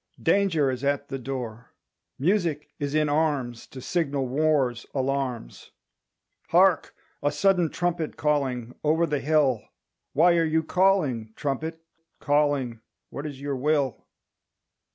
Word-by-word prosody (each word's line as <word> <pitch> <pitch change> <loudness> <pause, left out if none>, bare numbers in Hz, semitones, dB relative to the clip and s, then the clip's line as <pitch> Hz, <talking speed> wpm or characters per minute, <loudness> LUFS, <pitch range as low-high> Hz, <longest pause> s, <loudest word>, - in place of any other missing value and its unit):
Danger 165 -9 +3
is 130 +1 -5
at 140 0 0
the 135 -1 -4
door. 125 -3 -6 0.4
Music 165 -1 0
is 145 0 -2
in 155 -1 +3
arms. 145 -6 0
To 130 - -10
signal 140 -2 -1
war's 135 -3 +1
alarms, 130 - -2 0.8
Hark, - - +3 0.3
a 145 - +1
sudden 175 +2 +2
trumpet 175 -2 -2
calling 130 -5 0
Over 160 +3 +3
the 150 -3 -1
hill 140 -6 +2 0.5
Why 170 +4 +5
are 165 - +3
you 160 0 +1
calling, 155 - +1
trumpet, 160 +3 -3 0.4
calling? 145 -5 +1 0.3
What 145 +2 -5
is 140 -2 -8
your 140 -1 -2
will? 140 -1 0
145 Hz, 125 wpm, -26 LUFS, 130-160 Hz, 0.8 s, Why